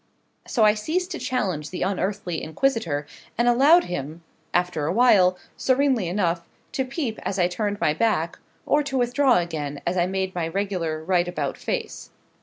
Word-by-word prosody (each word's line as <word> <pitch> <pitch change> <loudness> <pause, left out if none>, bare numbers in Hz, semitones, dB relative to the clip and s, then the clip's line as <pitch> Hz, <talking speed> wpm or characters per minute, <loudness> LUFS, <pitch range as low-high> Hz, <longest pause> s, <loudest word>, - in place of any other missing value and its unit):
So 235 - +2
I 210 -1 +6
ceased 330 - -2
to - - -4
challenge 185 -12 -2
the 185 - -3
unearthly 190 -2 -2
inquisitor, 160 - -1 0.3
and 235 +1 +2
allowed 280 +9 +6
him, 160 0 -5 0.3
after 175 -4 0
a - - +1
while, 195 -7 +5 0.2
serenely 260 -6 +2
enough, 175 -2 0 0.3
to 270 - -1
peep 260 -4 -3
as 195 - -3
I 175 -2 +3
turned 205 +2 -2
my 150 - +2
back, 170 -4 0 0.3
or 295 - +3
to 275 -2 -3
withdraw 250 +1 +3
again 155 -5 -3
as 175 +2 0
I 175 0 +2
made 190 0 -2
my 170 -2 -2
regular 165 -4 -2
right 175 0 +1
about 175 - -3
face. 480 -3 -4
190 Hz, 170 wpm, -24 LUFS, 170-245 Hz, 0.3 s, I